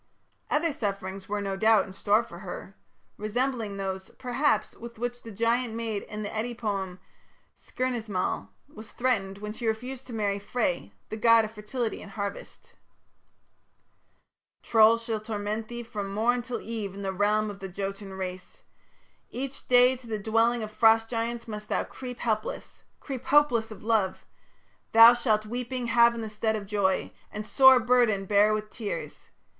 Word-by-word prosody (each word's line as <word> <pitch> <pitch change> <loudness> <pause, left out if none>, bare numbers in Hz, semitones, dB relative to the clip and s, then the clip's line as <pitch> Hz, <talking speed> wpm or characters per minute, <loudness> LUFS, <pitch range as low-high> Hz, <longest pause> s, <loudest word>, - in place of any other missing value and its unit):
Other 305 +1 +1
sufferings 195 -4 -4
were, 205 0 -1
no 195 -1 -2
doubt, 220 0 +4
in 190 - -11
store 205 +3 +2
for 170 - -11
her, 195 +1 -8 0.4
resembling 225 -1 -2
those, 190 -1 -4
perhaps, 260 +3 0
with 235 0 -10
which 245 +1 -3
the 230 - -10
giant 230 +2 0
maid 225 -3 -2
in 210 0 -7
the 205 - -4
Eddic 235 +2 -3
poem 195 -5 -3 0.6
"Skirnismal" 220 - -3 0.2
was 220 0 -11
threatened 200 -6 0
when 210 +1 -6
she 230 +1 -4
refused 250 +4 -3
to 245 - -8
marry 205 -2 -1
Frey, 200 - -2 0.2
the 220 - -4
god 230 0 +5
of 215 - -8
fertility 220 +2 -4
and 200 - -11
harvest: 200 -1 -6 1.9
Trolls 225 +1 +5
shall 225 -2 -2
torment 215 0 -3
thee 240 +1 -6
from 205 -3 -5
morn 235 +4 +1
till 245 0 -4
eve 215 -4 -5
In 200 - -7
the 190 0 -2
realms 210 +2 +1
of 200 - -11
the 195 -1 -6
Jotun 195 +1 -5
race, 185 -1 -7 0.7
Each 270 +2 -6
day 250 +1 +6
to 245 -1 -14
the 220 -1 -2
dwellings 225 +3 +2
of 215 - -6
Frost 225 +1 +4
giants 235 0 -2
must 210 -1 -7
thou - - +1
Creep 250 -2 -8
helpless, 215 -2 -3 0.2
creep 265 -4 -6
hopeless 250 -7 +4
of 215 - -11
love; 215 -4 0 0.7
Thou 230 +1 +10
shalt 215 -3 +1
weeping 245 +2 -4
have 235 0 +5
in 230 - -4
the 220 - -4
stead 220 +1 0
of 210 -2 -4
joy, 195 -2 0 0.2
And 210 0 -5
sore 265 +2 +7
burden 240 -5 +3
bear 205 +2 +4
with 215 0 -2
tears.... 215 -4 -6
220 Hz, 165 wpm, -27 LUFS, 205-240 Hz, 1.9 s, Thou